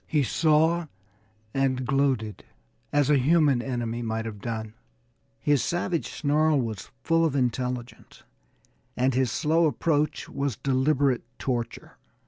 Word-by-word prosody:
He 150 -2 +2
saw, 160 +4 +2 0.7
and 130 -1 0
gloated 135 -6 0 0.5
as 145 0 +2
a 145 - +5
human 145 -2 +3
enemy 120 -2 -3
might 115 -1 -3
have 105 -3 -7
done. 110 -1 -4 0.7
His 145 -2 +2
savage 175 -1 -1
snarl 155 0 +2
was 110 -6 -4
full 165 0 +3
of 155 -4 +1
intelligence, 125 -1 -3 0.7
and 130 +1 +2
his 130 -2 +1
slow 160 +5 +2
approach 150 -1 0
was 140 -4 -2
deliberate 135 -1 +1 0.2
torture. 120 -3 -4
135 Hz, 120 wpm, -26 LUFS, 120-150 Hz, 0.7 s, a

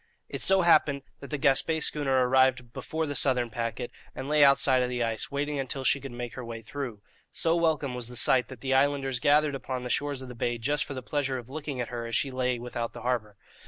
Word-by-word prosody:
It - - -5
so 190 -1 +6
happened 150 -4 +3 0.2
that 140 - -10
the 150 - -2
Gaspé 140 +4 +2
schooner 135 -4 +1
arrived 130 -2 +2
before 160 +4 -3
the 145 - -4
southern 125 -5 +2
packet, 120 +2 -4 0.2
and 130 - -6
lay 150 0 +4
outside 140 -2 +5
of 125 - 0
the 125 -1 -1
ice, 115 -1 -2
waiting 145 +1 -2
until 135 0 -3
she 140 +1 +3
could 135 -1 -7
make 120 -1 -6
her 130 - -7
way 115 -1 -7
through. 120 -4 -6 0.3
So 165 0 +1
welcome 160 -5 0
was 125 -2 -3
the 125 - -6
sight 125 +1 +3
that 130 -3 -11
the 135 -1 -1
islanders 135 -1 +1
gathered 145 +2 +3
upon 130 -1 -4
the 125 - -4
shores 145 -1 -1
of - - -9
the 125 - -8
bay 120 0 -2
just 145 +5 0
for 140 - -7
the 130 - -6
pleasure 140 -1 -2
of 125 +1 -10
looking 145 -3 -5
at 120 - -3
her 120 -1 -5
as 115 - -3
she 135 - 0
lay 125 -1 -1
without 120 -1 -5
the - - -9
harbour. 110 -5 -2
130 Hz, 240 wpm, -28 LUFS, 125-145 Hz, 0.3 s, so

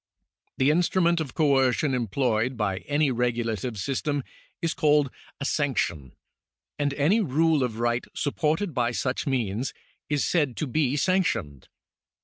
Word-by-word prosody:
The 135 +2 +4
instrument 170 +1 +2
of 140 -5 -6
coercion 135 -2 +2
employed 120 0 0
by 100 -3 0
any 145 -1 +2
regulative 120 -2 -1
system 140 - -1 0.4
is 165 - -1
called 150 -3 +3 0.3
a 140 - -3
sanction, 100 - -1 0.7
and 145 -1 +1
any 155 +11 +3
rule 160 -2 +2
of 120 -4 -1
right 120 +1 0
supported 160 +5 0
by 120 -1 0
such 130 +3 -2
means 120 -2 -1 0.3
is 145 -1 +1
said 145 -8 +1
to - - -1
be 140 0 0
sanctioned. 150 - 0
135 Hz, 130 wpm, -26 LUFS, 120-150 Hz, 0.7 s, The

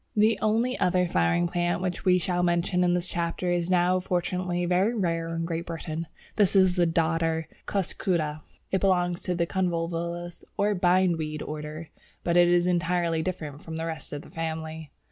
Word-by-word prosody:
The 215 +1 +4
only 230 +4 +2
other 180 0 +2
flowering 85 - +2
plant 175 0 0
which 180 +1 -3
we 180 -1 +5
shall 180 0 0
mention 175 +1 +2
in 175 0 +3
this 180 0 -2
chapter 170 +1 -2
is 175 0 0
now 180 0 +3
fortunately 180 0 -1
very 185 +6 +2
rare 165 -5 0
in 165 0 -2
Great 165 0 -3
Britain. 165 -1 -4 0.3
This 205 -3 +3
is 190 -2 +5
the 175 -2 +3
Dodder, 165 0 +1 0.2
Cuscuta. 170 -5 -1 0.3
It 190 - +1
belongs 180 -2 +2
to 180 - -2
the 170 0 +1
Convolvulus 170 -1 -2
or 205 +1 +2
Bindweed 175 -4 +1
order, 155 +1 -6 0.3
but 170 - +1
is 175 0 +5
entirely 175 -2 +1
different 155 -5 -4
from 160 - -7
the 160 0 -3
rest 160 -1 -5
of 145 0 -5
the - - -15
family. 160 -1 -4
175 Hz, 170 wpm, -27 LUFS, 165-180 Hz, 0.3 s, we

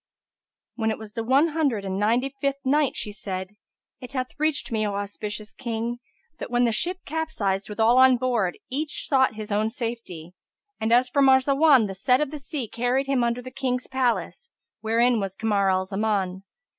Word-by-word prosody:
When 220 -2 -1
it 220 - -1
was 215 -1 -11
the 230 -2 -3
One 275 +7 +3
Hundred 280 -10 0
and 190 0 -2
Ninety 240 +6 +1
fifth 275 0 -1
Night, 290 +1 +2
She 210 - -3
said, 190 -2 -5 0.5
It 250 +1 -10
hath 255 -1 -2
reached 310 -3 0
me, 220 -1 0
O 200 - -3
auspicious 210 +1 -5
King, 235 0 -4 0.4
that - - -5
when 240 0 +2
the 235 - +3
ship 355 +12 0
capsized 220 -12 -2
with 210 - -8
all 235 +3 +5
on 260 -1 +6
board, 235 -8 0
each 295 +3 -3
sought 265 -5 +3
his 215 0 -7
own 215 +2 +1
safety; 225 -8 -6 0.5
and 220 +1 -1
as 245 +2 +5
for 280 +3 +1
Marzawan 270 0 +5
the 195 - -4
set 250 +7 +2
of 300 -2 -1
the 300 - -6
sea 275 -3 -4
carried 245 +5 0
him 270 -3 +1
under 235 +1 -1
the 255 - -8
King's 255 -1 -2
palace, 260 - -1 0.3
wherein 230 +2 +2
was 195 -2 -3
Kamar 205 -3 +1
al 185 0 +1
Zaman. 195 -2 -2
235 Hz, 190 wpm, -25 LUFS, 210-265 Hz, 0.5 s, on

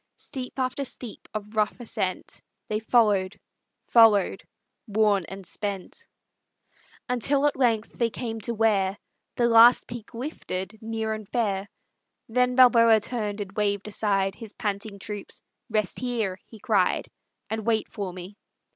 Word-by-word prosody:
Steep 260 -2 -7
after 260 +2 -1
steep 245 -3 -7
of 210 0 -6
rough 215 +2 +1
ascent 240 - -3 0.3
They 215 - 0
followed, 210 -4 +2 0.5
followed, 220 -4 +5 0.4
worn 205 -3 +2
and 195 0 -8
spent, 200 0 -6 1.0
Until 275 +3 +2
at 295 - +2
length 230 -4 +1
they 235 -1 +2
came 225 -1 -5
to 235 - -3
where 205 -3 +2 0.4
The 240 - +2
last 235 +1 +7
peak 235 -1 -9
lifted 220 - -5
near 220 0 -2
and 215 -2 -7
fair; 205 -4 -1 0.6
Then 250 +2 +1
Balboa 230 -3 +7
turned 210 -2 -3
and 195 -1 -6
waved 200 0 -1
aside 195 -2 0
His 220 0 -10
panting 205 -1 -3
troops. 205 0 -7 0.3
"Rest 215 -3 -1
here," 225 -7 -2
he 225 - -13
cried, 200 -3 +1 0.4
"And 220 0 -3
wait 220 0 +1
for 200 -3 -5
me." 180 +3 -9
220 Hz, 140 wpm, -26 LUFS, 200-235 Hz, 1.0 s, last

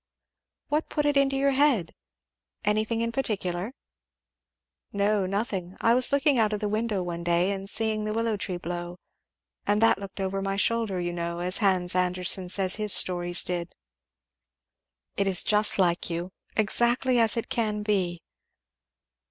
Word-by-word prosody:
"What 300 +2 -1
put 295 -1 -1
it 290 -1 +1
into 275 -1 +2
your 275 +1 +2
head? 265 - +1 0.7
anything 215 +2 0
in 230 0 -1
particular?" 210 -3 -3 1.2
"No 200 -1 0
nothing 195 -2 -4
I 230 - +3
was 250 +1 +3
looking 280 -2 +2
out 215 -1 +1
of 210 - -2
the 210 - -2
window 215 -2 -2
one 170 -1 -5
day 175 +2 +1
and 195 0 -2
seeing 220 -1 +2
the 215 - -3
willow 225 0 -1
tree 190 -3 -3
blow; 175 0 -6 0.7
and 205 +1 +2
that 225 - +4
looked 200 0 -9
over 195 0 -2
my 195 0 -2
shoulder; 220 -1 0
as 175 - -3
you 175 - -3
know 170 0 -4
Hans 185 -2 +2
Andersen 180 0 +1
says 185 +1 +4
his 210 -2 +2
stories 175 -1 +2
did." 175 -1 -5 1.4
"It 200 - +1
is 185 -2 +3
just 210 0 +3
like 175 -3 +1
you! 170 +2 -4 0.3
exactly 240 +3 +2
as 225 -1 +3
it 230 - -3
can 210 -3 -1
be." 185 -5 -1
200 Hz, 160 wpm, -26 LUFS, 180-225 Hz, 1.4 s, that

